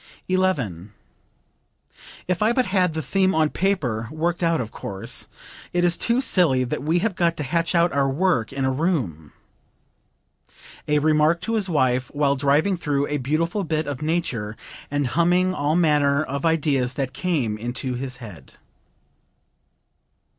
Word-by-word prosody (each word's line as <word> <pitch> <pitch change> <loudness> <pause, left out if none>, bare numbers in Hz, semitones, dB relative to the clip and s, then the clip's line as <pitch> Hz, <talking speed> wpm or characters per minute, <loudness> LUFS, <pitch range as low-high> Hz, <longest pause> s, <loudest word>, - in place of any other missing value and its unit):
11. 125 - -1 1.3
"If 180 +1 -1
I 220 +2 +3
but 255 0 +2
had 185 -4 +1
the 160 - -2
theme 190 +8 +1
on 155 -1 +2
paper, 140 - -1
worked 165 +2 -1
out, 165 -2 +2
of 110 -3 -4
course. 95 -1 -4 0.5
It 175 0 +1
is 175 -1 +4
too 235 +8 +1
silly 160 - +2
that 125 - -3
we 160 +5 +1
have 225 - 0
got 170 -2 +1
to 150 - -2
hatch 165 +5 -1
out 170 -1 +3
our 140 -1 +2
work 150 -5 +1
in 135 0 -2
a 130 - +1
room." 130 - -2 1.6
(A 150 - +2
remark 155 +2 +3
to 230 - -3
his 210 -4 0
wife 130 -5 +1
while 140 -1 +2
driving 145 +7 +2
through 145 -4 0
a 150 - 0
beautiful 165 +9 -1
bit 155 -2 -1
of 145 -2 -5
nature 130 -10 -2 0.3
and 145 0 0
humming 175 +7 +2
all 150 -2 0
manner 150 -3 +3
of 140 +2 -2
ideas 140 -6 +1
that 135 -2 -3
came 145 -12 -1
into 120 +3 -4
his 125 +1 -4
head.) 105 -8 -11
150 Hz, 155 wpm, -23 LUFS, 130-175 Hz, 1.6 s, is